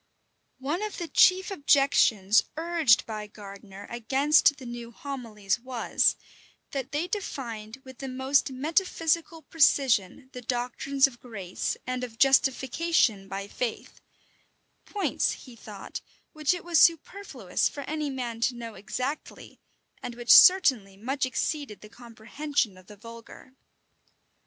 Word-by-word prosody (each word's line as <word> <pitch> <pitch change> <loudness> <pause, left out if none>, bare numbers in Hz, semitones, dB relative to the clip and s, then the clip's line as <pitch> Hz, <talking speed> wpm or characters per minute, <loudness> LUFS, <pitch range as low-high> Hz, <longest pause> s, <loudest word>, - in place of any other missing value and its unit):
One 290 +8 -3
of 425 -1 -5
the 345 - -4
chief 370 +3 +4
objections 275 - +3
urged 320 -8 +3
by 215 -2 -6
Gardiner 200 -1 -12
against 275 +5 +2
the 260 - -11
new 240 -1 -7
homilies 230 -6 -4
was, 245 -1 0 0.6
that 270 -1 -5
they 300 +5 -2
defined 245 - -6
with 260 -1 -13
the 270 - -6
most 265 +2 +1
metaphysical 325 +3 -1
precision 260 - +2
the 250 - -8
doctrines 250 +3 0
of 250 -3 -5
grace, 195 -7 -5
and 255 0 -3
of 230 -3 -7
justification 265 -4 +2
by 195 +1 -6
faith; 235 +2 -5 0.8
points, 410 - -1
he 250 -3 -13
thought, 210 -3 -9 0.3
which 310 +2 +1
it 355 - -9
was 340 -3 +3
superfluous 330 - +1
for 285 - -8
any 300 +1 -3
man 240 -4 -5
to 245 +1 +1
know 230 -2 -8
exactly, 255 +9 -6 0.4
and 245 - -6
which 240 0 +4
certainly 255 - +6
much 260 +5 -2
exceeded 275 -3 -3
the 210 - -13
comprehension 235 +1 -4
of 185 0 -18
the 210 - -13
vulgar. 230 +3 -13
255 Hz, 130 wpm, -27 LUFS, 225-290 Hz, 0.8 s, certainly